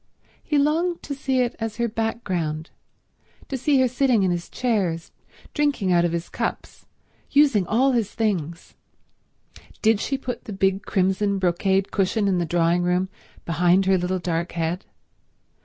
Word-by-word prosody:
He 300 Hz, -, 0 dB
longed 325 Hz, +5 st, +1 dB
to 285 Hz, -, -4 dB
see 270 Hz, -2 st, 0 dB
it 245 Hz, -1 st, -1 dB
as 225 Hz, -2 st, -3 dB
her 235 Hz, +1 st, 0 dB
background, 185 Hz, -9 st, -3 dB, 0.8 s
to 275 Hz, -, -2 dB
see 270 Hz, +2 st, +2 dB
her 260 Hz, -, +4 dB
sitting 250 Hz, -4 st, +2 dB
in 185 Hz, -, +2 dB
his 175 Hz, -1 st, -3 dB
chairs, 195 Hz, -10 st, -1 dB, 0.4 s
drinking 290 Hz, -11 st, +1 dB
out 175 Hz, -1 st, +4 dB
of 175 Hz, -, +1 dB
his 170 Hz, 0 st, -3 dB
cups, -, -, -5 dB, 0.4 s
using 275 Hz, -11 st, +4 dB
all 260 Hz, +5 st, +3 dB
his 230 Hz, -5 st, 0 dB
things. 175 Hz, -8 st, -2 dB, 1.1 s
Did 220 Hz, -1 st, +4 dB
she 275 Hz, +5 st, -1 dB
put 250 Hz, -3 st, -6 dB
the 210 Hz, -, -6 dB
big 195 Hz, 0 st, +1 dB
crimson 195 Hz, +1 st, +1 dB
brocade 190 Hz, +1 st, +1 dB
cushion 200 Hz, +1 st, +1 dB
in 185 Hz, -2 st, +2 dB
the 170 Hz, -, -1 dB
drawing 170 Hz, +1 st, +2 dB
room 180 Hz, +1 st, +1 dB, 0.4 s
behind 175 Hz, +3 st, +3 dB
her 190 Hz, 0 st, +4 dB
little 180 Hz, +1 st, -1 dB
dark 170 Hz, -1 st, -2 dB
head? 170 Hz, +3 st, -2 dB
195 Hz, 155 wpm, -23 LUFS, 175-240 Hz, 1.1 s, her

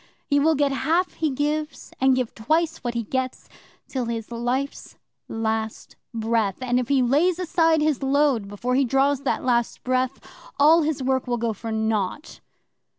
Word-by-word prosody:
He 285 Hz, -, +2 dB
will 315 Hz, +2 st, +3 dB
get 285 Hz, -1 st, +2 dB
half 325 Hz, +7 st, 0 dB
he 315 Hz, -, -1 dB
gives, 300 Hz, +3 st, -3 dB
and 265 Hz, 0 st, +5 dB
give 255 Hz, -3 st, -2 dB
twice 315 Hz, +8 st, 0 dB
what 240 Hz, -2 st, -4 dB
he 235 Hz, -, -1 dB
gets, 260 Hz, +3 st, -3 dB, 0.4 s
till 255 Hz, -3 st, -3 dB
his 230 Hz, -1 st, -4 dB
life's 245 Hz, +4 st, -3 dB, 0.3 s
last 220 Hz, -1 st, -3 dB, 0.2 s
breath; 225 Hz, -3 st, 0 dB
and 250 Hz, -1 st, 0 dB
if 250 Hz, -, -2 dB
he 270 Hz, -1 st, +3 dB
lays 310 Hz, +8 st, +2 dB
aside 330 Hz, -3 st, +2 dB
his 300 Hz, -3 st, +1 dB
load 270 Hz, -5 st, +2 dB
before 220 Hz, +5 st, -3 dB
he 270 Hz, +2 st, +3 dB
draws 270 Hz, +2 st, +2 dB
that 280 Hz, -, -1 dB
last 240 Hz, -2 st, 0 dB
breath, 255 Hz, +1 st, 0 dB, 0.4 s
all 315 Hz, +4 st, +6 dB
his 300 Hz, -3 st, -1 dB
work 260 Hz, 0 st, 0 dB
will 240 Hz, -1 st, 0 dB
go 230 Hz, -1 st, -1 dB
for 225 Hz, +2 st, -6 dB
naught." 220 Hz, +3 st, -2 dB
260 Hz, 170 wpm, -24 LUFS, 235-290 Hz, 0.4 s, all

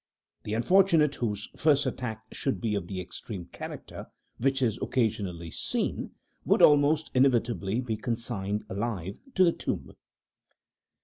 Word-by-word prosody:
The 105 Hz, -, -2 dB
unfortunate 160 Hz, +3 st, +4 dB
whose 105 Hz, -5 st, -3 dB
first 145 Hz, -2 st, +3 dB
attack 115 Hz, -4 st, -4 dB
should 135 Hz, -, -1 dB
be 115 Hz, -3 st, -1 dB
of 100 Hz, -4 st, -2 dB
the 95 Hz, -1 st, -4 dB
extreme 90 Hz, +1 st, -6 dB
character -, -, -8 dB, 0.3 s
which 135 Hz, +2 st, +1 dB
is 115 Hz, -3 st, +1 dB
occasionally 100 Hz, -9 st, -1 dB
seen, -, -, -2 dB, 0.3 s
would -, -, +3 dB
almost 150 Hz, +1 st, +5 dB
inevitably 120 Hz, -5 st, +2 dB
be 115 Hz, -4 st, -3 dB
consigned 110 Hz, -3 st, -2 dB
alive 100 Hz, -2 st, -3 dB, 0.2 s
to 185 Hz, -, +6 dB
the 170 Hz, -, +5 dB
tomb. -, -, -4 dB
115 Hz, 130 wpm, -28 LUFS, 105-135 Hz, 0.3 s, to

